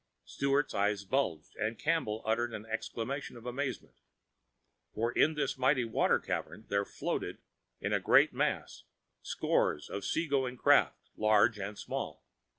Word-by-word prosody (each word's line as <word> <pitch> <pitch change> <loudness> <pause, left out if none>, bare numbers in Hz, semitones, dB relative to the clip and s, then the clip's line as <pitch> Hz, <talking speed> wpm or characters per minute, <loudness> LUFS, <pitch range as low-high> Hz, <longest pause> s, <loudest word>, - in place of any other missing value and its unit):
Sturt's 140 +1 0
eyes 100 0 0
bulged 95 - -1
and 110 +1 -2
Campbell 150 -9 0
uttered 115 +2 0
an 105 - -7
exclamation 115 +4 -4
of 120 - -13
amazement. 130 +2 -4 1.0
For 115 +2 0
in 155 +5 +3
this 140 -3 -1
mighty 130 -1 +3
water 115 - +2
cavern 110 - -4
there 100 0 +1
floated - - -3 0.4
in - - -2
a - - +3
great - - +5
mass, - - -2 0.4
scores 75 - 0
of 100 - -4
sea 165 - 0
going 130 -3 0
craft, - - +3
large 110 0 +4
and 100 +1 -5
small. - - -5
115 Hz, 145 wpm, -32 LUFS, 105-135 Hz, 1.0 s, great